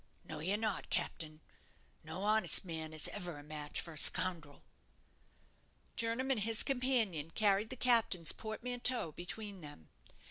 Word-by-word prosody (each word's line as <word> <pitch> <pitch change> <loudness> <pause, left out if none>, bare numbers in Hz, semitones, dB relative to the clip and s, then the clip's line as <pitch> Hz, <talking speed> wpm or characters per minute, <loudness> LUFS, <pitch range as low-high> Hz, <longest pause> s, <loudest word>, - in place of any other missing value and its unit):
"No, - - -7
you're 190 +7 0
not, 215 -2 -2
captain. 155 -1 -3 0.6
No 160 +5 -6
honest 215 -1 +4
man 160 -2 -5
is 155 -1 +1
ever 175 -6 -5
a 145 - -10
match 150 0 -4
for 165 - -5
a - - -11
scoundrel." 170 -6 +1 1.3
Jernam 230 +4 -1
and 255 - +2
his 225 +2 +3
companion 245 - +1
carried 205 +3 +1
the 260 - -5
captain's 230 -9 +3
portmanteau 240 -2 -2
between 190 +4 -6
them. 145 - -12
195 Hz, 140 wpm, -35 LUFS, 160-225 Hz, 1.3 s, honest